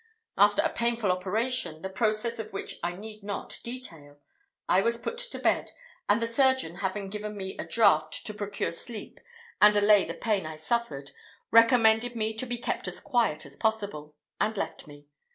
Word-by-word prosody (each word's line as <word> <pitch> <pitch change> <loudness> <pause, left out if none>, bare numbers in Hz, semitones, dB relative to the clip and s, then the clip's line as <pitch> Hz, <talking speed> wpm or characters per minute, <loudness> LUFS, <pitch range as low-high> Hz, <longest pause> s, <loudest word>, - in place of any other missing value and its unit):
After 205 +9 +4
a 325 - 0
painful 235 -4 +1
operation, 185 -2 -1
the - - -2
process 215 +4 0
of 220 - -6
which 195 - -6
I 175 +1 -2
need 215 +2 -10
not 200 0 -5
detail, 165 - -8 0.5
I 185 - +4
was 230 +3 +1
put 470 - -5
to - - -6
bed, - - 0 0.4
and 205 - +4
the 230 - 0
surgeon 260 - +2
having 195 +1 -3
given 210 0 -5
me 190 -1 -5
a - - -3
draught 155 -8 +3
to 215 - -3
procure 205 -1 -3
sleep 215 +6 -6 0.4
and 210 0 +8
allay 205 -1 +6
the - - -5
pain 210 -4 0
I 155 - -6
suffered, 155 -5 -2 0.4
recommended 230 0 +5
me 220 -1 -1
to 255 - 0
be 245 0 -2
kept 235 - -3
as - - +1
quiet 225 - 0
as 140 - -6
possible, 200 -9 -2 0.2
and 220 0 0
left - - -4
me. 145 0 -14
210 Hz, 180 wpm, -28 LUFS, 185-235 Hz, 0.5 s, and